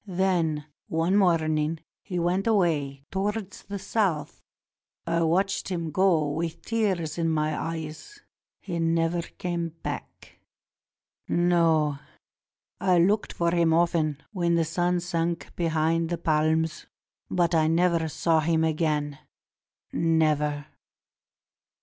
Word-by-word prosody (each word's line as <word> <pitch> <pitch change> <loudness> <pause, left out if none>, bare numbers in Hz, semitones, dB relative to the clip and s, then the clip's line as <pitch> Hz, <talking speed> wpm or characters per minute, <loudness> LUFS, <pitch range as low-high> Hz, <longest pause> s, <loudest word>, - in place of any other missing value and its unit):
Then 175 -5 0 0.2
one 165 +4 +1
morning 160 -4 +2 0.2
he 180 -3 -5
went 180 +4 0
away 150 -10 +1
towards 200 +1 -3
the 200 - -6
South. 185 -8 -1 0.6
I 170 0 0
watched 195 +5 +1
him 170 -4 -3
go 170 -3 +3
with 165 +2 -4
tears 190 -8 -1
in 165 -1 +1
my 155 -1 0
eyes. 165 - -6 0.4
He 175 -3 -4
never 165 +1 +1
came 170 0 -4
back. - - -7 0.9
No; 165 -4 +2 0.8
I 185 -2 +3
looked 200 +5 +2
for 170 0 0
him 170 -2 +3
often 160 -4 +1
when 170 -4 +1
the 165 -1 +2
sun 175 +2 0
sank 170 -1 -2
behind 165 0 +1
the 175 - -1
palms, 160 0 0 0.4
but 175 -1 +1
I 160 -1 +3
never 170 0 +2
saw 160 +1 +1
him 160 +1 +1
again 150 -2 0 0.5
— - - -48
never." 150 -3 +1
165 Hz, 120 wpm, -26 LUFS, 155-175 Hz, 0.9 s, go